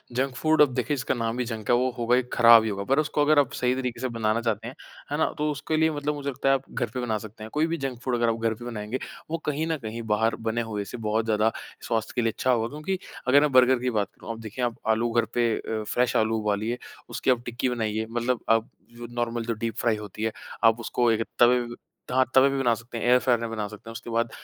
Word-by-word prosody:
Junk 130 0 0
food, 155 +3 +3
अब 140 -4 +5
देखिए 125 +3 -1
इसका 125 - -1
नाम 115 +1 -2
ही 125 - 0
जंक 110 -3 -6
है, 120 - +6
वो 125 +1 +2
होगा 120 0 +2
ही 125 - +3
ख़राब 115 -1 +8
ही 110 - -1
होगा। 100 -1 -3
पर 135 +8 +2
उसको 150 -1 0
अगर 150 0 +5
आप 140 - +2
सही 125 0 +1
तरीके 125 -3 -3
से 130 - 0
बनाना 115 0 0
चाहते 115 0 -2
हैं, 130 - -8 0.4
है 145 - 0
ना, 160 - +3
तो 150 0 0
उसके 155 +2 -2
लिए 160 0 +3
मतलब 150 0 -2
मुझे 140 -1 -4
लगता 135 0 -1
है 135 - +6
आप 135 - -3
घर 120 -2 -2
पे 125 - -3
बना 110 -3 -1
सकते 110 0 -10
हैं। 110 - -7
कोई 155 +2 +2
भी 165 0 -2
जंक 135 -3 -4
फूड 125 -1 -1
अगर 120 -1 +2
आप 115 0 -1
घर 115 -1 +1
पे 120 +2 -10
बनाएँगे, 115 +1 -4 0.3
वो 165 - 0
कहीं 150 +2 -1
न 160 - 0
कहीं 110 +1 -5
बाहर 110 +2 +2
बने 115 +1 0
हुए 105 -1 -2
से 125 - -7
बहुत 110 0 0
ज़्यादा 110 0 +2 0.4
स्वास्थ्य 110 -1 -1
के 125 - +2
लिए 115 -1 +1
अच्छा 130 - 0
होगा। 115 -2 +1
क्योंकि 155 +8 -3 0.3
अगर 140 +3 +6
मैं 150 - +2
बर्गर 130 0 +5
की 125 +1 -1
बात 105 -4 0
करूँ, - - -8
अब 115 - -10
देखिए, 115 +3 -3
आप 120 -2 -2
आलू 115 +2 +2
घर 115 0 +2
पे 120 -1 +2
अ, 110 -1 -3
फ्रेश 120 +3 0
आलू 110 0 +2
उबालिए, 105 +3 -1 0.3
उसकी 130 - +1
आप 120 -1 0
टिक्की 120 +2 -1
बनाइए, 110 -2 -1
मतलब 120 +1 0
आप 115 0 +3 0.3
जो 120 0 -7
नॉर्मल 120 -1 -1
जो 115 - -1
डीप 115 +1 -4
फ्राई 115 -2 +2
होती 105 +1 -7
है, 110 - +1 0.3
आप 115 +1 +5
उसको 120 0 +1
एक 115 0 +1 0.2
तवे 125 +1 +6
व 120 0 -6 0.4
हाँ, 130 +1 +4
तवे 135 +1 +7
पे 140 - -1
बना 120 -3 +3
सकते 115 +1 -9
हैं, 115 - -3
एयर 125 +1 +6
फ्रायर 125 -1 +2
में 115 0 -3
बना 110 -2 -3
सकते 105 +2 -11
हैं। - - -6
उसके 115 +1 -8
बाद, 115 0 0
120 Hz, 280 wpm, -26 LUFS, 110-130 Hz, 0.4 s, ख़राब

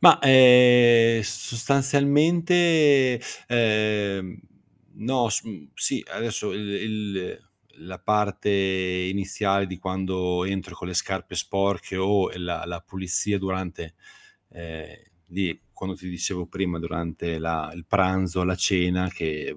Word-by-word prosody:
Ma, - - +8
ehm, 125 -3 +7
sostanzialmente, 140 - +2 0.3
ehm, 105 -5 0 0.6
no 120 0 -1
sum 100 -8 -5
sì, - - -1
adesso 115 -2 -3
il 105 0 -5
il 100 -3 -5 0.3
la 90 +1 -10
parte 105 -1 0
iniziale 95 +1 -1
di 95 -1 -8
quando 95 -1 -2
entro 95 0 -5
con 90 - -8
le - - -6
scarpe 95 +1 -3
sporche 100 -1 -2
o 95 0 +1
la 90 -1 -4
la 85 -1 -6
pulizia 95 +3 -2
durante 95 -3 -5 0.6
ehm, 80 -2 -11 0.3
di 90 -2 -3 0.2
quando 95 -1 -5
ti 90 - -11
dicevo 90 0 -4
prima, 90 -3 -3
durante 85 -1 -5
la 80 -1 -3
il 85 -1 -13
pranzo, 95 -1 +1
la 90 0 0
cena, 90 0 +1
che 80 -4 -5
95 Hz, 115 wpm, -24 LUFS, 90-110 Hz, 0.6 s, Ma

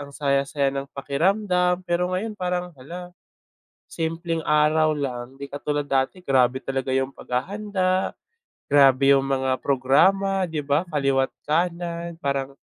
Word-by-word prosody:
ang 145 - -8
saya-saya 140 0 0
ng 135 0 -4
pakiramdam, 180 +5 +1
pero 180 0 0
ngayon 215 +3 -3
parang, 180 -2 -3
hala 175 +6 -9 0.8
simpleng 165 0 -2
araw 155 +1 +3
lang. 130 -2 -5
Di 140 - -6
katulad 145 0 -2
dati 135 +4 0
grabe 130 -1 +3
talaga 135 -1 -3
yung 135 +1 0
paghahanda, 185 +6 -2 0.5
grabe 140 -1 +5
yung 135 - +3
mga 130 -1 0
programa 190 +9 +3
di 160 - -3
ba, 145 +2 +1
kaliwa't 135 -3 +1 0.2
kanan. 170 +1 -1
Parang 140 -2 -3
145 Hz, 125 wpm, -24 LUFS, 135-180 Hz, 0.8 s, grabe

